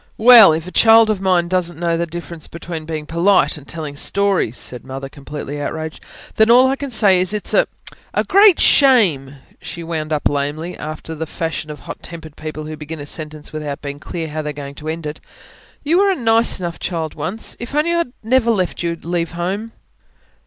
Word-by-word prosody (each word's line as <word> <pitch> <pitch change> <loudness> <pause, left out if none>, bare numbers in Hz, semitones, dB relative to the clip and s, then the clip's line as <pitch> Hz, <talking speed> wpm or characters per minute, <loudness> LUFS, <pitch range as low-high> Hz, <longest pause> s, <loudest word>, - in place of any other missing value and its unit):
"Well, 225 -5 +9
if 160 +1 -2
a 180 - -8
child 225 +1 +6
of 200 -3 -3
mine 180 -3 +2
doesn't 175 -2 -1
know 170 -1 0
the 170 +1 -2
difference 170 -1 -8
between 170 -1 -7
being 155 -1 -5
polite 170 +5 +2
and 145 -3 -13
telling 155 -3 -6
stories," 195 - 0
said 125 - -4
Mother, 135 +1 -7
completely 145 +1 -7
outraged, 160 +1 -5 0.3
"then, 220 +1 +4
all 250 +2 +7
I 265 - +1
can 280 0 -6
say 200 -6 +4
is, 185 +3 +1
it's 210 - -2
a... - - +4 0.4
a - - 0
great 395 -2 +5
shame!" 185 - +4 0.3
she 170 - -7
wound 160 -2 -4
up 150 -1 +1
lamely, 145 +5 -3
after 155 +1 -7
the 160 0 -5
fashion 160 -1 -4
of 150 -2 -8
hot - - -9
tempered 160 -3 -10
people 155 0 -7
who 155 0 -6
begin 155 +1 -8
a 145 - -7
sentence 155 0 -6
without 150 -2 -5
being 140 0 -6
clear 165 +1 -5
how 155 +1 -4
they 150 - -5
are - - -4
going 140 -1 -8
to 150 +2 -10
end 165 0 -5
it. 150 0 -6 0.6
"You 325 +5 +2
were 400 0 +4
a 385 - +2
nice 230 - +3
enough 170 -2 -5
child 165 -3 -3
once. 170 +9 -3
If 240 +4 -7
only 310 +3 +2
I'd 340 -7 -1
never 235 +1 +2
let 185 -6 0
you 170 -1 -2
leave 170 0 -2
home." 195 +6 -3
170 Hz, 210 wpm, -18 LUFS, 155-210 Hz, 0.6 s, Well